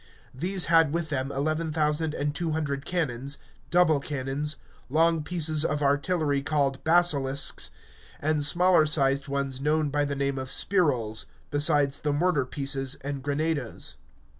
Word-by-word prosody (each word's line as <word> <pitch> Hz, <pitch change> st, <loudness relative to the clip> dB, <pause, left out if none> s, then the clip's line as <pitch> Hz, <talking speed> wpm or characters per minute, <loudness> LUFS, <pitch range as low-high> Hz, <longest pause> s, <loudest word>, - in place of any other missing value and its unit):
These 180 Hz, +7 st, +1 dB
had 165 Hz, -2 st, +3 dB
with 170 Hz, -2 st, -2 dB
them 135 Hz, -1 st, -2 dB
eleven 155 Hz, +3 st, -2 dB
thousand 150 Hz, 0 st, 0 dB
and 145 Hz, +1 st, -2 dB
two 165 Hz, 0 st, -2 dB
hundred 145 Hz, -2 st, -3 dB
cannons, 140 Hz, -5 st, -2 dB, 0.3 s
double 175 Hz, -4 st, +3 dB
cannons, 140 Hz, +1 st, -2 dB, 0.3 s
long 165 Hz, +3 st, +2 dB
pieces 155 Hz, -2 st, +2 dB
of 150 Hz, -2 st, -1 dB
artillery 145 Hz, 0 st, 0 dB
called 140 Hz, -2 st, -1 dB
basilisks, 145 Hz, -5 st, +2 dB, 0.5 s
and 155 Hz, 0 st, 0 dB
smaller 175 Hz, +1 st, +4 dB
sized 140 Hz, -2 st, +1 dB
ones 135 Hz, -1 st, -3 dB
known 150 Hz, +1 st, +1 dB
by 145 Hz, +1 st, 0 dB
the 140 Hz, 0 st, -3 dB
name 140 Hz, -1 st, -2 dB
of 130 Hz, 0 st, -6 dB
spirols, 130 Hz, -, +1 dB, 0.2 s
besides 145 Hz, -1 st, +3 dB
the 150 Hz, -1 st, -1 dB
mortar 150 Hz, -3 st, +1 dB
pieces 135 Hz, -1 st, -1 dB
and 140 Hz, 0 st, -5 dB
grenadoes. 145 Hz, -2 st, -3 dB
145 Hz, 140 wpm, -26 LUFS, 140-160 Hz, 0.5 s, smaller